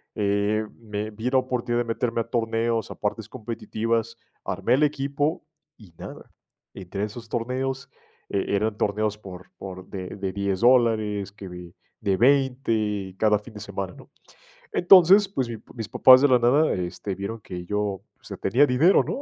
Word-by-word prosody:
eh, 105 +1 0 0.2
me 105 -1 -5
vi 110 +4 -3
la 130 0 +3
oportunidad 120 -2 -1
de - - -13
meterme 115 0 -1
a - - -4
torneos, 115 -1 -1
a - - -7
partes 105 +1 -3
competitivas, 115 -1 -3 0.3
armé 120 - +1
el 145 - +2
equipo 145 +1 -1 0.3
y 100 -7 -17
nada. - - -10 0.4
Entre 95 +1 -5
esos 115 +2 -6
torneos 130 +3 -3 0.4
e 100 0 -1
eran 105 +1 -1
torneos 105 0 -1
por 95 -3 -11
por 95 -1 -8
de 95 -2 -6
de 95 -2 -3
$10 100 -2 -2
dólares, 110 -5 +3
que 100 -2 -10
de 90 0 -10 0.3
de 100 -3 +1
$20 115 -7 +1
cada 105 0 +3
fin 110 +2 -14
de 105 - -9
semana, 100 -2 -5
¿no? - - -15 0.6
Entonces, 190 +2 +6
pues, 135 -11 -3
mi 115 - -5 0.2
mis 115 -3 -6
papás 130 0 +7
de 145 - +5
la 125 -1 +5
nada, 135 +7 +3
este, 90 +2 -4
vieron 105 +4 -6
que 90 -3 -8
yo, 105 +3 -1
o 100 -3 -3 0.2
sea, - - -9
tenía 125 +9 +3
dinero, 145 +9 +4
¿no? - - -4
110 Hz, 170 wpm, -24 LUFS, 100-125 Hz, 0.6 s, papás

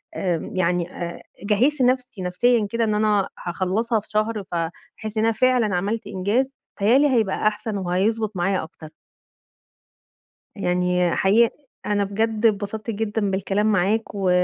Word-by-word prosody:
آمم، 175 -4 -2
يعني 180 -1 0
آآ، 170 -2 -6 0.2
جهّزت 250 +8 +2
نفسي 250 -5 +1
نفسيًا 210 +5 +2
كده 230 +2 0
إن 215 -1 +1
أنا 210 -2 +2 0.2
هاخلّصها 200 +6 0
في 210 - -16
شهر، 215 0 -1
فهاحس 175 +6 -5
إن 215 - +2
أنا 225 - +3
فعلًا 240 -4 +2
عملت 205 +5 -2
إنجاز، 220 +9 0 0.3
بيتهيأ 215 +6 +5
لي 290 +1 +4
هيبقى 220 -5 +1
أحسن 210 0 -2
وهيضبط 200 +4 0
معايا 185 +2 0
أكتر. 160 -1 -11 1.7
يعني 180 -2 +1
حقيقي 220 +4 +3 0.3
أنا 205 -1 +1
بجد 220 +2 0
اتبسطت 215 +1 -1
جدًا 210 -1 -1
بالكلام 195 +2 0
معاك 205 +3 +2
و 195 -2 0
210 Hz, 140 wpm, -23 LUFS, 185-225 Hz, 1.7 s, بيتهيأ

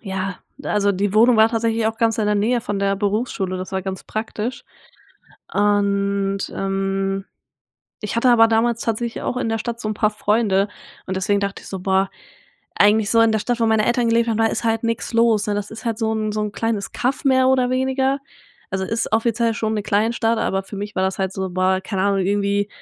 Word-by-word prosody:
ja, 190 -2 -4 0.2
also 205 -1 +1
die 200 +1 -1
Wohnung 230 +2 +5
war 220 0 +6
tatsächlich 225 -1 0
auch 225 0 -1
ganz 230 0 +1
in 215 - +1
der 210 - +2
Nähe 230 +4 +1
von 205 -4 -3
der 200 0 +1
Berufsschule, 200 -2 -1
das 185 0 -6
war 190 - -1
ganz 190 0 -5
praktisch 220 +2 -4 0.9
und, 200 -1 +1 0.2
ähm, 195 0 -1 0.8
ich 210 - -3
hatte 235 +2 +3
aber 225 -2 +6
damals 230 +1 +1
tatsächlich 230 +1 -2
auch - - -2
in 250 - -1
der 225 0 -1
Stadt 235 +1 -4
so 215 - -3
'n 215 - -2
paar 210 0 +2
Freunde 210 -2 +1 0.4
und 190 - -3
deswegen 200 +2 +1
dachte 200 -1 -3
ich - - -12
so: 190 - -5
„Boah, 190 +1 +1 0.7
eigentlich 210 +1 +4
so 230 - +4
in 230 -1 +4
der 220 - +1
Stadt, 245 +2 -1
wo 230 - +3
meine 220 -1 +2
Eltern 240 0 +2
gelebt 230 0 +2
haben, 225 -1 0
ist - - -3
halt 225 0 0
nix 230 +1 -2
los“, 230 -2 +3
ne, 205 - +1
das 205 +1 -4
ist 220 0 -9
halt 230 -2 -2
so 220 -1 0
'n 215 -1 -1
so 215 0 -2
'n 210 -1 -3
kleines 220 -2 -2
Kaff 260 +4 -1
mehr 260 -1 +4
oder 255 -1 +3
weniger. 265 +1 0 0.5
Also, 190 0 -1
ist 225 +4 -2
offiziell 230 +1 +1
schon 220 0 -1
'ne 210 - -1
Kleinstadt, 225 +2 +1
aber 195 -3 0
für 200 - -9
mich 205 +1 -5
war 185 - +1
das 190 +1 -1
halt 190 -1 -1
so 190 -1 -3
boah, 185 +1 +1
keine 190 -1 -2
Ahnung, 200 0 +2
irgendwie 200 +1 0
215 Hz, 220 wpm, -21 LUFS, 195-230 Hz, 0.9 s, war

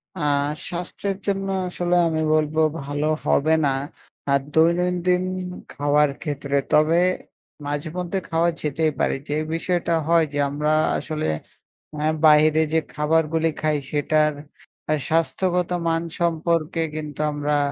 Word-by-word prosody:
আ - - -7 0.5
স্বাস্থ্যের 180 +3 -3
জন্য 195 0 0 0.2
আসলে 180 0 -1
আমি 160 -1 -1
বলবো 155 0 +1 0.2
ভালো 145 +2 -2 0.2
হবে 155 +3 +3
না। - - +3 0.6
আর 140 - +4
দৈনন্দিন 180 +2 +2 0.5
খাওয়ার 145 0 +2
ক্ষেত্রে। 140 -2 -2 0.2
তবে 155 +3 +4 0.7
মাঝে 145 +2 -3
মধ্যে 180 +2 -2
খাওয়া 165 +1 +2
যেতেই 155 +1 0
পারি। - - +1
যে 150 - 0 0.2
বিষয়টা 170 0 0
হয় 170 -1 +4
যে 145 - -1
আমরা 150 +2 -1 0.3
আসলে 155 -1 -3 0.7
আ - - -7 0.3
বাহিরে 155 +1 +6
যে 160 - +3
খাবারগুলি 160 +1 +1
খাই 155 -1 +2
সেটার 150 +1 +2 0.8
স্বাস্থ্যগত 175 +2 +1 0.2
মান 165 0 +1 0.2
সম্পর্কে 165 0 0
কিন্তু 150 -1 -6
আমরা 145 0 0
160 Hz, 120 wpm, -23 LUFS, 150-170 Hz, 0.8 s, বাহিরে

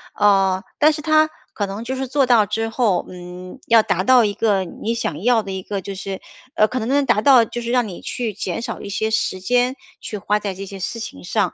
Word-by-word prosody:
呃， 195 -2 +3 0.2
但 305 +1 +5
是 300 - -5
它 310 0 +3 0.2
可 205 - -1
能 200 +3 -6
就 260 +2 -4
是 265 0 -3
做 275 +1 +2
到 235 -4 +4
之 225 +3 -2
后， 225 -6 +1
嗯， 180 +4 -10
要 230 -1 +6
达 185 - 0
到 250 +3 +6
一 205 -2 0
个 200 -3 +1
你 210 +5 -4
想 170 -9 -3
要 235 -2 +3
的 195 - -6
一 190 0 -4
个， 200 +1 -4
就 200 +2 -6
是 195 0 -6 0.3
呃， 215 -9 +4
可 255 - -2
能 225 - -3
能 280 +2 +2
达 240 -4 +3
到 260 -2 +7
就 240 +2 -5
是 235 - -5
让 250 -1 +2
你 180 - -8
去 235 -3 -4
减 210 +3 -4
少 - - -5
一 200 - -8
些 220 +2 -1
时 190 -3 -1
间 245 +6 +1 0.2
去 210 - -6
花 210 +1 0
在 205 -2 -3
这 195 +2 -7
些 195 0 -9
事 225 +5 -4
情 95 - -7
上。 - - 0
215 Hz, 265 characters per minute, -20 LUFS, 195-245 Hz, 0.3 s, 到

